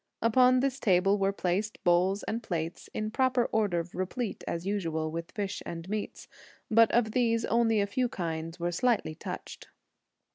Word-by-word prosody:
Upon 250 +2 +4
this 275 0 -1
table 195 -1 +3
were 195 0 +2
placed 200 +3 -1
bowls 180 +3 +3
and 230 +2 -3
plates, 170 -5 -4
in 215 0 -3
proper 255 -1 +2
order 185 -6 +1
replete, 195 +4 -3
as 170 +1 -3
usual, 165 -6 -1
with 165 +1 -5
fish 200 -2 -4
and 165 0 -7
meats; 210 0 -4 0.4
but 230 0 +6
of 230 -2 +2
these 230 -1 +1
only 225 -1 +2
a 200 - +2
few 245 +5 -1
kinds 165 -2 -4
were 175 +1 -1
slightly 215 -3 +1
touched. - - -8
200 Hz, 160 wpm, -29 LUFS, 175-230 Hz, 0.4 s, but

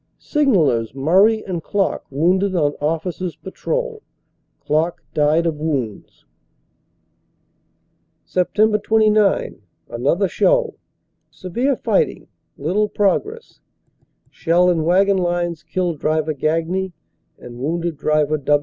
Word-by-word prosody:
Signallers 160 - +1
Murray 195 +10 +3
and 180 -3 -4
Klock 195 +3 -1
wounded 185 +7 +1
on 145 -4 +1
Officer 165 +4 -2
s 170 - -8
Patrol; 480 - -4 0.6
Klock 160 +3 -1
died 155 +3 +2
of 160 -3 -1
wounds. 135 -10 -4 2.0
"Sept. 210 +3 +1
29 215 - +2 0.3
Another - - 0
show. - - +2 0.6
Severe 240 +10 -2
fighting, 475 - 0 0.3
little 210 +3 0
progress. 410 - -1 0.7
Shell 175 +2 +2
in 160 -3 0
wagon 195 +3 +3
lines 175 -2 -1
killed 170 0 -2
Driver 155 0 0
Gagne 165 +6 -1 0.4
and 120 0 -11
wounded 165 +3 -2
Dvr. 155 0 +1
175 Hz, 100 wpm, -20 LUFS, 155-210 Hz, 2.0 s, Murray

